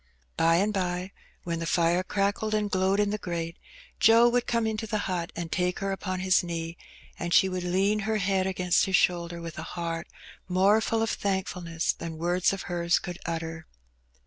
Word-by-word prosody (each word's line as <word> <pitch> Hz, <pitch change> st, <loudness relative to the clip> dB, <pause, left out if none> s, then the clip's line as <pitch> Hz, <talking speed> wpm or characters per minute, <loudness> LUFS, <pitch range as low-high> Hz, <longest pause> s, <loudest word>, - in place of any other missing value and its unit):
By 165 Hz, 0 st, +4 dB
and 200 Hz, +5 st, +2 dB
bye, 180 Hz, -1 st, -2 dB, 0.3 s
when 170 Hz, -1 st, -3 dB
the 165 Hz, -, -3 dB
fire 170 Hz, +1 st, +2 dB
crackled 200 Hz, +3 st, -1 dB
and 210 Hz, -1 st, -1 dB
glowed 190 Hz, +2 st, +2 dB
in 205 Hz, -1 st, +2 dB
the 210 Hz, -, -2 dB
grate^ 170 Hz, -2 st, -3 dB, 0.5 s
Joe 230 Hz, +1 st, +7 dB
would 245 Hz, 0 st, 0 dB
come 230 Hz, -1 st, +1 dB
into 220 Hz, 0 st, -2 dB
the 215 Hz, -, -1 dB
hut 175 Hz, -3 st, -2 dB
and 170 Hz, -1 st, -5 dB
take 180 Hz, -1 st, 0 dB
her 195 Hz, 0 st, -2 dB
upon 185 Hz, -1 st, -3 dB
his 185 Hz, -1 st, +3 dB
knee, 165 Hz, -1 st, -4 dB, 0.4 s
and 175 Hz, -, -3 dB
she 190 Hz, -, +6 dB
would 185 Hz, -1 st, -3 dB
lean 190 Hz, +4 st, +1 dB
her 215 Hz, +1 st, 0 dB
head 190 Hz, -1 st, +1 dB
against 185 Hz, -2 st, +2 dB
his 190 Hz, -, +1 dB
shoulder 170 Hz, -1 st, +1 dB
with 165 Hz, -2 st, -7 dB
a 165 Hz, +2 st, -7 dB
heart 165 Hz, -1 st, -3 dB, 0.4 s
more 195 Hz, +4 st, +4 dB
full 225 Hz, 0 st, 0 dB
of 225 Hz, -, 0 dB
thankfulness 180 Hz, -4 st, -1 dB
than 165 Hz, -1 st, -7 dB
words 175 Hz, +2 st, +2 dB
of 195 Hz, 0 st, -4 dB
hers 170 Hz, -2 st, +1 dB
could 175 Hz, -2 st, -6 dB
utter. 165 Hz, 0 st, -4 dB
185 Hz, 195 wpm, -27 LUFS, 170-200 Hz, 0.5 s, Joe